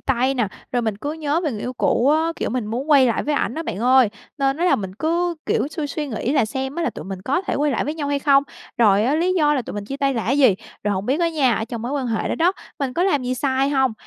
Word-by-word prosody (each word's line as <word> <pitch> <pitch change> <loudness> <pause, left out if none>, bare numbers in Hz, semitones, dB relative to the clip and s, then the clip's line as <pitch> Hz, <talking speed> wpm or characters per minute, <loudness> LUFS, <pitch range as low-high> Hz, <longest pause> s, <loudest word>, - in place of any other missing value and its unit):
tay 260 +1 +1
nè, 235 -6 0 0.2
rồi 245 -1 +1
mình 220 -3 -1
cứ 290 +8 -4
nhớ 315 +1 -1
về 300 - +1
người 210 - -5
yêu 250 - -4
cũ 255 +1 +1
á, 320 +2 +2
kiểu, - - -2
mình 245 -2 -2
muốn 255 +8 -3
quay 270 -3 +6
lại 230 - 0
với 295 0 -1
ảnh 245 - -1
á 325 - -3
bạn 195 - -5
ơi, 250 0 +5 0.3
nên 270 0 +1
á 345 - -1
là 360 - +4
mình 190 -2 -6
cứ, 340 +6 0
kiểu, - - +1
suy 310 -1 -4
suy 295 +1 -4
nghĩ 245 +2 -2
là 275 - +3
xem 265 +4 -4
á 340 - -2
là - - 0
tụi - - -9
mình 190 -1 -7
có 280 - 0
thể - - -2
quay 295 +1 +1
lại 240 - 0
với 300 - -3
nhau 295 -3 -3
hay 285 0 +1
không, 275 -1 +4 0.4
rồi 210 -2 +4
á, 270 - +2
lý 355 +4 +1
do 295 -2 +3
là 260 - 0
tụi - - -8
mình 205 -1 -4
chia 275 +6 -5
tay 275 -1 0
là 230 - -2
cái 270 +4 +1
gì, 255 -9 +6 0.3
rồi 205 - +1
hổng 190 +2 -3
biết 280 +7 +1
á 340 - +3
nha, 275 -7 +2
ở 220 - -2
trong 230 0 -6
mối 250 +4 -3
quan 275 -3 -1
hệ 225 -2 -1
đó - - 0
đó, 345 +3 +3 0.3
mình 275 -4 -2
có 345 - 0
làm 330 -8 +2
gì 255 +1 -1
sai 265 +1 0
hông. 265 -4 +2
270 Hz, 315 wpm, -21 LUFS, 235-300 Hz, 0.4 s, quay